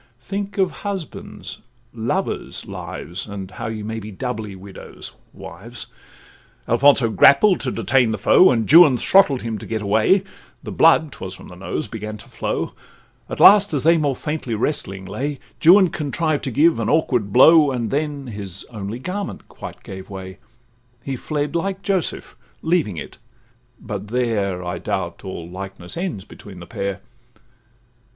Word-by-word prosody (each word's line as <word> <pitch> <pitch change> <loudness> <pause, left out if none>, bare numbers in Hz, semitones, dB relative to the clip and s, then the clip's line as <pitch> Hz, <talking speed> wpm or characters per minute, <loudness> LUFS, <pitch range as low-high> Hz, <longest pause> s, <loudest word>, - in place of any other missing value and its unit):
—Think 200 +11 -5
of 190 -2 +2
husbands', 195 -6 -6 0.3
lovers' 115 0 -3
lives! 90 +4 -7
And 100 -2 -7
how 110 +5 -6
ye 110 -1 -5
may 110 +1 -4
be 105 0 -8
doubly 110 -1 -5
widows—wives! 95 0 -11 0.8
Alfonso 125 -1 +4
grappled 160 - +5
to 130 - -2
detain 120 +2 +2
the 110 - -1
foe, 185 - +6
And 115 -3 +1
Juan 155 -5 +8
throttled 150 -4 +4
him 115 -2 -3
to - - -9
get 110 -1 -3
away, 110 - +3 0.4
And - - -6
blood 160 -2 +5
('twas 95 -8 -7
from - - -13
the 90 - -11
nose) 95 +11 -4
began 110 -1 -6
to 100 - -15
flow; - - -3 0.6
At - - -5
last, 200 -4 +7
as 140 - -1
they 165 +2 +5
more 145 -3 0
faintly 150 -5 -3
wrestling 100 -6 -3
lay, 135 +9 -4 0.3
Juan 185 +3 +7
contrived 155 0 -2
to 135 - -2
give 160 +7 +3
an - - -1
awkward 125 -10 +1
blow, 150 +5 +7
And 120 -4 -2
then 145 -1 -2
his 100 -5 -7
only 105 0 -5
garment 190 +9 -5
quite - - -10
gave 95 -1 -9
way; 95 -1 -8 0.6
He 135 - -3
fled, 150 +4 -3
like 195 +3 -2
Joseph, 190 -4 -1 0.3
leaving 160 - +1
it; - - -8 0.6
but 105 -2 -6
there, 105 -6 -1
I 90 - -4
doubt, - - -4
all 85 -3 -6
likeness 95 0 -8
ends 170 - -4
between 100 -4 -12
the 85 - -9
pair. 100 +1 -4
120 Hz, 155 wpm, -21 LUFS, 100-155 Hz, 0.8 s, Juan